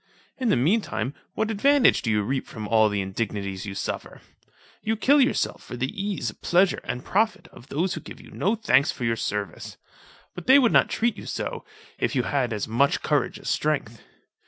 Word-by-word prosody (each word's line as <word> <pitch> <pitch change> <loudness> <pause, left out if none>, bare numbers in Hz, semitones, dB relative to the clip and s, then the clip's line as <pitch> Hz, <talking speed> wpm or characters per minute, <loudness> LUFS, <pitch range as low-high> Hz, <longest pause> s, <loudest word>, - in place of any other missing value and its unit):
In 255 -3 +1
the - - +4
mean 170 - +3
time, 135 -8 -3 0.2
what 220 0 0
advantage 275 +4 +4
do 120 - -2
you 105 -1 +2
reap 130 +5 -2
from 110 -3 -7
all 110 0 +4
the 100 -1 -1
indignities 100 -1 -4
you 100 - -6
suffer." - - -5 0.6
You 220 +1 0
kill 275 +6 +4
yourself 260 - +1
for 125 - -8
the 130 +2 -2
ease, 195 - -3
pleasure, 180 - +2
and 125 +1 -4
profit 215 +3 0
of 120 - -15
those 175 +6 -1
who - - -5
give - - -11
you - - -14
no 205 +5 0
thanks 150 - +3
for - - -7
your 115 -1 +1
service. 105 -5 -4 0.6
But 180 - -9
they 265 - +8
would 250 -5 +4
not - - +5
treat 235 0 0
you - - -9
so, - - -4 0.3
if - - 0
you - - +2
had 135 -5 0
as 105 -2 -2
much 125 +6 +1
courage 145 -4 0
as - - -5
strength. 135 -7 -1
140 Hz, 205 wpm, -25 LUFS, -, 0.6 s, they